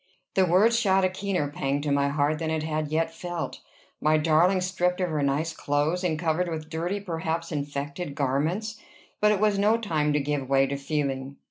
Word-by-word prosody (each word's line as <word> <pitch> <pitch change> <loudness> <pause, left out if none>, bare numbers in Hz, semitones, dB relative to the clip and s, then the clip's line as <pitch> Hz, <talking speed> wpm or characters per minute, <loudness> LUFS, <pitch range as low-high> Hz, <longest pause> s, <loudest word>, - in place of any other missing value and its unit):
The 190 -1 +3
words 215 +7 +4
shot 195 -4 +3
a - - +2
keener 185 -4 -1
pang 140 -1 -1
to 145 0 -1
my 140 0 +2
heart 145 +1 +1
than 160 -1 -2
it 160 -1 -1
had 155 -1 -1
yet 160 +2 0
felt. 175 0 -5 0.4
My 155 +1 +4
darling 165 +5 +3
stripped 180 0 0
of 180 -2 0
her 150 -2 0
nice 145 +4 0
clothes, 150 +5 0
and 165 -4 0
covered 165 +2 0
with 160 -1 -5
dirty, 175 +5 -2
perhaps 165 -3 -3
infected 145 +1 -4
garments. 160 +11 -1 0.4
But 210 0 +4
it 210 - +1
was 210 -1 +2
no 215 +3 +4
time 155 -9 0
to 150 - +2
give 140 -2 -2
way 135 0 +4
to 140 +1 -3
feeling. 140 -1 -2
160 Hz, 200 wpm, -26 LUFS, 145-180 Hz, 0.4 s, words